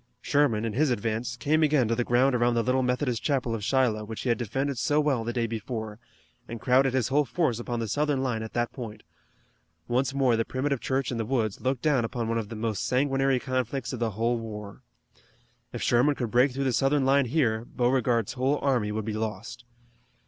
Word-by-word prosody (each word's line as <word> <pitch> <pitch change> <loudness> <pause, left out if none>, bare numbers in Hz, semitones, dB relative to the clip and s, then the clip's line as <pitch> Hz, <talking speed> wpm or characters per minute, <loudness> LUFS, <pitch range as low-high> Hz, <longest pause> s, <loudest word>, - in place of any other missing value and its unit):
Sherman, 130 -7 +1
in 110 - -2
his 145 +5 +2
advance, 115 +1 -2
came 150 +6 +1
again 150 -6 +3
to 115 - +1
the 120 +1 0
ground 125 +3 +3
around 120 0 +2
the 115 - +2
little 130 +2 +1
Methodist 125 -1 0
chapel 130 -5 0
of 110 -2 -4
Shiloh 120 -3 +1
which 110 +1 -6
he 125 - -2
had 120 - +2
defended 135 +3 -2
so 145 +4 +2
well 140 -6 +1
the 120 - -2
day 120 -1 -1
before, 110 -1 -5 0.5
and 115 0 -6
crowded 130 +2 +3
his 130 -2 +1
whole 145 +2 +3
force 130 -2 -1
upon 120 0 -3
the 115 - -2
Southern 145 +2 0
line 120 -4 -1
at 110 - -7
that 120 0 -1
point. 110 -5 -8 0.8
Once 130 +3 +1
more 135 -3 +2
the 115 - +1
primitive 135 +2 -2
church 130 -1 -1
in 120 - -3
the - - 0
woods 110 -4 -1
looked 130 -1 -1
down 145 -6 +3
upon 115 0 -3
one 115 0 0
of 105 -2 -5
the 115 - -6
most 110 -3 -2
sanguinary 135 0 +2
conflicts 130 0 -2
of 125 - -4
the 115 -1 0
whole 115 +1 +1
war. 105 -3 -8 0.9
If - - -5
Sherman 130 +5 +3
could 120 -5 -3
break 125 +3 +4
through 135 +2 -3
the 130 -2 +1
Southern 135 +2 +2
line 135 0 +4
here 120 -5 +1
Beauregard's 120 -2 0
whole 135 +3 +1
army 125 -7 +1
would 110 0 -3
be 110 - -3
lost. 110 +2 -5
120 Hz, 215 wpm, -27 LUFS, 115-135 Hz, 0.9 s, break